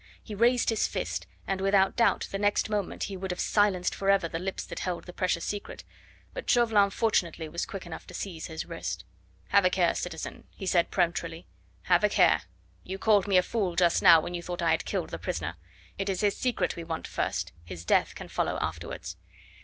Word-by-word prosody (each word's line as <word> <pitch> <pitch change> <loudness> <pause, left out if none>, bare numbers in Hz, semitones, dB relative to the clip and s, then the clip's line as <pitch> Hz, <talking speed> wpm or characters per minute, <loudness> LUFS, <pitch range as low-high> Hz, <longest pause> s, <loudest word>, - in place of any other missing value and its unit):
He 215 - -8
raised 235 +3 +3
his 225 - +1
fist, - - -3 0.2
and 195 -1 -2
without 195 0 +3
doubt 235 - +2
the 195 - -2
next 205 +1 +1
moment 205 -3 -2
he 200 - -4
would 190 0 -5
have 180 - -3
silenced 200 -4 +2
forever 195 -3 +2
the 165 0 -4
lips 190 +2 -4
that - - -6
held 180 -2 -3
the 180 - -10
precious 180 -3 0
secret, 205 -1 -5 0.5
but - - -6
Chauvelin 225 -5 +4
fortunately 180 -7 0
was 170 +2 -3
quick 195 -2 -7
enough 170 -2 -8
to - - -10
seize 170 -5 -5
his 160 -1 -5
wrist. - - -5 0.4
"Have 200 - +5
a 185 - +5
care, 180 -2 +2
citizen," 165 -3 -5
he 195 - -7
said 175 -2 +2
peremptorily; 170 -2 -1 0.4
"have - - +3
a - - +5
care! - - +4 0.4
You 190 +1 -5
called 205 -1 +3
me 195 -2 +4
a 180 - +5
fool 195 -6 -1
just 175 -1 +3
now 170 -3 +9
when 175 - -5
you 175 - -3
thought 175 0 -4
I - - +3
had - - +1
killed - - -2
the - - -5
prisoner. 85 +2 -3 0.4
It 195 0 -1
is 190 -2 -1
his 205 -1 +2
secret 235 -8 0
we 170 - -6
want 165 -1 -4
first; - - -2
his 85 -1 -9
death - - +2
can - - -8
follow - - -1
afterwards." - - -5
185 Hz, 210 wpm, -28 LUFS, 170-205 Hz, 0.5 s, now